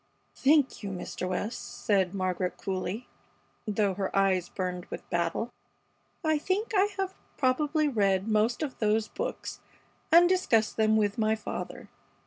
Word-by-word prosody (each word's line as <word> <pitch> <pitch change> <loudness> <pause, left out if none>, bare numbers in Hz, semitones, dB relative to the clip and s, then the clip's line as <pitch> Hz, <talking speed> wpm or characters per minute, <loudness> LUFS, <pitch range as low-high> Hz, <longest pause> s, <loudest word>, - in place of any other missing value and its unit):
"Thank 285 0 +3
you, 200 - -4
Mr. 185 0 -4
West," 210 +5 -4
said 195 -4 +2
Margaret, 185 -1 -1
coolly, 190 +4 -3 0.6
though 205 -2 +1
her 195 0 -2
eyes 190 -3 +2
burned 180 -2 -3
with - - -8
battle. 170 +7 0 0.7
"I 315 -1 +2
think 400 +8 -1
I 390 -1 +5
have 385 -1 -1 0.2
probably 295 +4 +2
read 200 -6 +2
most 220 +5 +2
of 280 -4 -5
those 215 0 +2
books - - -5 0.5
and 340 +2 +8
discussed 295 -13 +2
them 220 0 +3
with 205 0 +1
my 220 0 +3
father. 220 - -6
215 Hz, 140 wpm, -29 LUFS, 190-290 Hz, 0.7 s, and